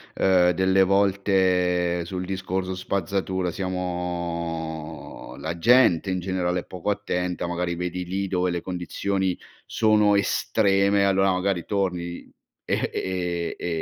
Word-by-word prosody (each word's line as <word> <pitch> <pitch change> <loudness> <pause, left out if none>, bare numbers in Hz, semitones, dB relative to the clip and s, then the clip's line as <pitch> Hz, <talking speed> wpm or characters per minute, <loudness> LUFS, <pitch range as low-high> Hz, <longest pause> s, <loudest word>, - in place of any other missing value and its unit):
ehm, 90 -2 +4
delle 95 +2 +3
volte, 95 -3 +2
sul 90 +1 -5
discorso 95 0 -3
spazzatura, 95 -1 -2
siamo 85 -4 -4
la 85 +2 -4
gente, 105 -3 +4
in 95 - -1
generale 90 -1 -1
è - - -18
poco 90 +2 -5
attenta, 90 -4 -2
magari 85 0 -2
vedi 90 +1 -3
lì, 95 +2 -2
dove 90 -1 0
le 85 - -1
condizioni, 95 +1 -2 0.3
sono 105 -2 +3
estreme, 100 0 +2
allora 95 0 +3
magari 90 -2 0
torni, 90 -4 -2 0.4
e - - 0
e 90 -2 -2
e - - -5
90 Hz, 120 wpm, -24 LUFS, 90-95 Hz, 0.4 s, ehm